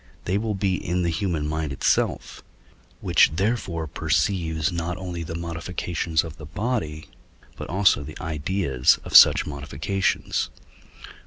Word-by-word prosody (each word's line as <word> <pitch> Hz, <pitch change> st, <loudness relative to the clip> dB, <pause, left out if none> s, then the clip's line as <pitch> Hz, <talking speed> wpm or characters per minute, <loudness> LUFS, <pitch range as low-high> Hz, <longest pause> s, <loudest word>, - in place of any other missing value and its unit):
they 90 Hz, -, 0 dB
will 105 Hz, 0 st, -1 dB
be 95 Hz, -1 st, 0 dB
in 90 Hz, +1 st, -1 dB
the 85 Hz, -, 0 dB
human 80 Hz, -4 st, -2 dB
mind 80 Hz, -1 st, -2 dB
itself, 70 Hz, -, -1 dB, 0.6 s
which -, -, +4 dB
therefore 95 Hz, -4 st, -1 dB
perceives 80 Hz, +1 st, 0 dB
not 85 Hz, +1 st, -3 dB
only 90 Hz, -2 st, -5 dB
the 85 Hz, 0 st, -6 dB
modifications 85 Hz, -1 st, -2 dB
of 80 Hz, -2 st, -9 dB
the 75 Hz, -, -9 dB
body, 90 Hz, -6 st, -3 dB, 0.5 s
but -, -, -8 dB
also 95 Hz, -4 st, +3 dB
the 75 Hz, +2 st, -9 dB
ideas 80 Hz, -4 st, +1 dB
of -, -, -5 dB
such -, -, +8 dB
modifications. 75 Hz, +7 st, -2 dB
85 Hz, 135 wpm, -24 LUFS, 80-95 Hz, 0.6 s, such